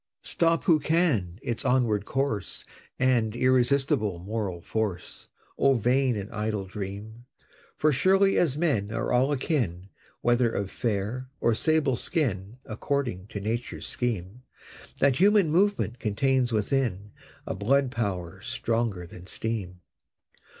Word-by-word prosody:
Stop 165 -1 +1
who 165 -5 +4
can 145 - +1
its 120 - -3
onward 120 -6 +2
course 135 -7 -2 0.3
And 120 -4 +2
irresistible 125 -5 +2
moral 95 -1 -4
force; 105 0 -4 0.3
O 135 -1 +4
vain 125 +2 +2
and 100 0 -5
idle 105 -3 -2
dream! 105 +4 -7 0.5
For 155 - +3
surely 195 +7 +3
as 150 -5 +2
men 130 -12 0
are 115 - -2
all 130 +3 +3
akin, 115 - -1 0.3
Whether 120 0 +3
of 100 -3 -3
fair 115 +3 -2
or 115 - +2
sable 150 +2 +2
skin, 115 - -2
According 115 -4 -2
to 105 -1 -6
Nature's 115 +4 -3
scheme, 115 -2 -3 0.6
That 135 -2 +3
Human 200 -4 +4
Movement 180 - +1
contains 125 +4 +1
within 105 -2 -1 0.3
A - - -3
Blood 125 +7 +1
Power 95 -8 -3
stronger 115 -6 -1
than 90 +1 -12
Steam. 95 -6 -4
115 Hz, 125 wpm, -27 LUFS, 100-135 Hz, 0.6 s, who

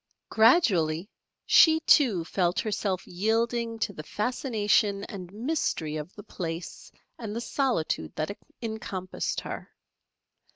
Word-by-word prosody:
Gradually 200 - +3 0.3
she, 320 -1 +6
too, 230 - +4
felt 175 0 0
herself 200 -4 -2
yielding 230 +4 0
to 210 -2 -2
the 155 - -7
fascination 210 - 0
and 185 -4 -8
mystery 215 - -2
of 150 +3 -6
the 205 - -10
place 170 -2 -6 0.3
and 220 -3 -5
the - - -1
solitude 235 - -1
that 155 +6 -3 0.3
encompassed 200 -5 -3
her. - - -7
205 Hz, 115 wpm, -27 LUFS, 175-230 Hz, 0.3 s, she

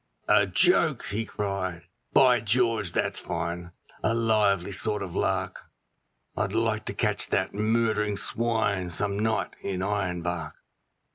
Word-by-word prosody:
'A - - +5
joke!' - - +3
he 110 +3 -2
cried, 95 -5 -3 0.3
'By 125 -3 +5
George, 115 -3 +1
that's - - 0
fine; 85 +1 -4 0.3
a 115 - +1
lively 105 -5 +2
sort 105 +2 -1
of 90 - -7
lark; - - -1 0.7
I'd - - -1
like 110 -1 0
to - - -4
catch 105 -3 0
that 95 - 0
murdering 105 -1 +1
swine 105 -5 0
some 100 +3 -2
night 110 +1 0
in 95 -2 -3
Ironbark.' 90 -5 -2
105 Hz, 130 wpm, -27 LUFS, 95-110 Hz, 0.7 s, A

